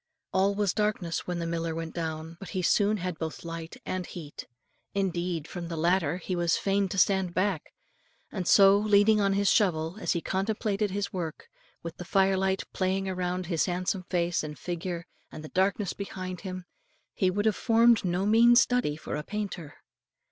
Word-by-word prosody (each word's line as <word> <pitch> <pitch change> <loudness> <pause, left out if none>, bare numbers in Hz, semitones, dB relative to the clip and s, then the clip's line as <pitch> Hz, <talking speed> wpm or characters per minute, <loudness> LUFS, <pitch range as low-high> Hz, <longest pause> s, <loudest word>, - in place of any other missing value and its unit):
All 195 +1 +2
was 205 -2 +1
darkness 210 -6 -1
when 180 -1 -2
the 170 - -3
miller 165 -1 -2
went 165 0 -5
down, 160 -1 -4
but 195 - -9
he 185 - 0
soon 205 +4 +3
had 180 -3 -4
both 160 -1 -5
light 165 -1 -6
and 185 0 -2
heat. 160 -4 -9 0.5
Indeed, 175 -4 -1
from 175 -2 -6
the 165 -1 -5
latter 170 -1 +2
he 185 +1 -4
was 175 -1 +2
fain 195 0 +1
to 195 - -4
stand 190 -2 +2
back; 185 -4 0 0.6
and 185 -4 -4
so, 195 0 +7
leaning 210 0 +4
on 195 -1 +2
his 200 0 +1
shovel, 170 -1 +1
as - - +1
he 170 - 0
contemplated 205 +3 -1
his 200 +1 -3
work, 175 - -5 0.3
with 165 0 -7
the - - -6
firelight 190 +1 +2
playing 190 +1 0
around 180 -1 -2
his 170 -2 +1
handsome 185 +1 -1
face 175 -1 +1
and 150 -1 -6
figure 175 0 -4 0.3
and 155 - -9
the 155 - -8
darkness 195 +1 0
behind 185 -3 -6
him, 185 -2 -6 0.5
he 185 - +2
would 205 +3 -1
have 220 - +3
formed 230 -1 +4
no 180 +1 0
mean 230 +3 +6
study 245 -11 +3
for 155 - -5
a 150 - -2
painter. 190 -4 -5
185 Hz, 185 wpm, -28 LUFS, 170-200 Hz, 0.6 s, so